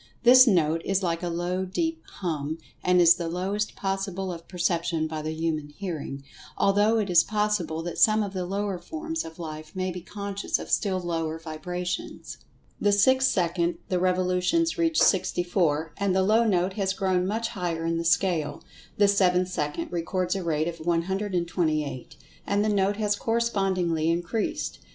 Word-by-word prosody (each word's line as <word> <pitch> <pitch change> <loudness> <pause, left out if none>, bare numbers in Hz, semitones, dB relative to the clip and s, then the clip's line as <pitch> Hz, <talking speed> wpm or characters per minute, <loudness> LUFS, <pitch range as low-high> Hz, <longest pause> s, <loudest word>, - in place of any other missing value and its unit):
This 255 +1 +8
note 165 -5 +3
is 195 0 0
like 170 -1 -1
a 175 - -2
low, 175 +2 -2
deep 325 - -2 0.2
"hum," 155 -3 -2 0.3
and 180 0 +4
is 170 -1 +8
the 170 -1 -4
lowest 195 +5 -2
possible 195 -1 -3
of 165 -1 -10
perception 170 -2 0
by 155 -1 -4
the 155 - -4
human 160 -2 -2
hearing, 150 -5 -6 0.3
although 205 +3 +3
it 210 -3 0
is 175 -2 +5
pos[Pg 210 -4 0
130]sible 160 +1 -4
that 175 - -5
some 215 -2 +5
of 200 -1 -5
the 180 -2 -3
lower 200 -1 -2
forms 325 - -4
of 160 0 -10
life 155 -1 -8
may 185 0 -1
be 180 0 -7
conscious 200 +2 -3
of - - -8
still 190 -3 +1
lower 165 -2 -2
vibrations. 180 +3 -5 0.4
The 205 - +3
sixth 260 +6 +4
second 170 -1 0
the 180 - +1
revolutions 185 - +1
reach 330 -2 +1
sixty 185 -2 +3
four, 160 -4 0
and 200 -2 0
the 190 - +3
low 220 +4 +4
note 185 -2 +1
has 195 -2 -1
grown 185 -1 0
much 225 +3 -1
higher 170 -5 -3
in 165 0 0
the - - -2
scale. 165 -4 +1 0.3
The 205 - +5
seventh 185 -2 +3
second 150 -1 -3
records 180 +1 -1
a 190 - -3
rate 160 -1 0
of 170 -1 -5
128, 170 -5 -1 0.3
and 205 +1 +1
the - - +1
note 200 0 +1
has 210 -1 +1
correspondingly 195 -8 0
increased. 175 +6 -2
180 Hz, 175 wpm, -26 LUFS, 165-200 Hz, 0.4 s, This